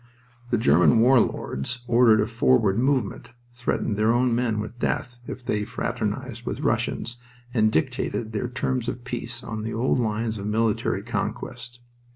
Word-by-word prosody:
The 120 - +2
German 90 +2 +5
war 125 +3 +6
lords 115 - -2
ordered 120 -2 +5
a - - +2
forward 115 -3 +2
movement, 130 -3 0 0.2
threatened 120 -3 -1
their 110 +1 +3
own 120 0 +2
men 115 -2 0
with 110 +3 -6
death 120 -1 -2
if 125 - -7
they 105 -2 0
fraternized - - -3
with - - -4
Russians, 120 +1 -1 0.4
and 110 -3 +3
dictated 120 -4 -1
their 110 +3 -2
terms 125 -1 -1
of 120 -1 -6
peace 120 -1 -4
on 110 -1 -5
the 110 +1 -4
old 125 +3 +1
lines 110 -1 -1
of 100 - -4
military 110 0 0
conquest. 120 0 -4
115 Hz, 160 wpm, -25 LUFS, 110-125 Hz, 0.4 s, war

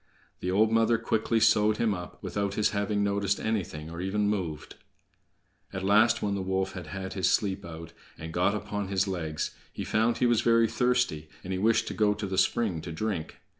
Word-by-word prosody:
The 90 - -3
old 105 +4 +3
mother 115 +1 +3
quickly 115 0 0
sewed 110 -1 +4
him 110 -3 +1
up, 90 -2 -7
without 100 -1 -2
his 105 - +2
having 100 0 0
noticed 100 0 0
anything, 90 -8 -3
or 85 +1 -6
even 100 +2 0
moved. 90 -7 -3 1.0
At 95 -1 -5
last, 110 +4 +4
when 100 -1 0
the 100 - -2
wolf 95 0 -1
had - - -8
had 95 -1 -5
his 95 - +1
sleep 100 -1 0
out, 85 0 -9 0.2
and 80 +1 -7
got 90 +4 +2
upon 105 -1 -3
his 100 +1 0
legs, 80 -5 -3 0.2
he - - -5
found 115 +2 +1
he - - +2
was 120 -2 +3
very 115 -1 +4
thirsty, 125 -12 0
and 95 +1 -3
wished 115 +2 +3
to - - -4
go 105 -1 +2
to 105 0 -4
the 95 -1 -1
spring 100 -9 +1
to 85 - -7
drink. 85 -1 -4
100 Hz, 200 wpm, -28 LUFS, 95-110 Hz, 1.0 s, sewed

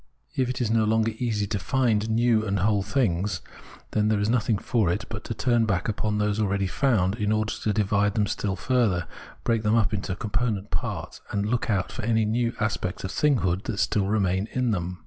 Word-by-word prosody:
If 130 -2 +1
it 125 - -3
is 115 -3 0
no 115 -1 +3
longer 110 +1 +2
easy 110 -5 0
to 100 0 -2
find 115 -2 +1
new 115 0 +3
and 100 -2 -1
whole 105 0 +2
things, 100 -6 0 0.5
then 105 0 +2
there 110 -1 +2
is 105 +2 +1
nothing 115 -3 +2
for 110 -4 +1
it 95 +5 -2
but 110 -1 -6
to 115 - -4
turn 120 -2 +2
back 100 -3 0
upon 105 -1 -1
those 105 0 0
already 100 -2 +1
found, 100 -2 +1
in 105 0 0
order 110 0 0
to 110 - +1
divide 105 -1 +1
them 105 - +2
still 100 -1 -2
further, 110 -9 +1 0.4
break 115 -2 +1
them 105 +1 +2
up 110 -2 +2
into 95 -2 -2
com 105 +2 -6
ponent 110 -3 -1
parts - - -4
and 100 0 -1
look 115 +3 -1
out 95 -4 0
for - - -5
any 110 -1 +2
new 115 +2 +1
aspects 105 -4 -2
of 95 - -3
thing 145 +6 +3
hood 90 +2 0
that 100 - -3
still 100 -1 +1
remain 100 -1 +1
in 125 -2 +1
them. 90 -2 -3
105 Hz, 220 wpm, -26 LUFS, 100-115 Hz, 0.5 s, no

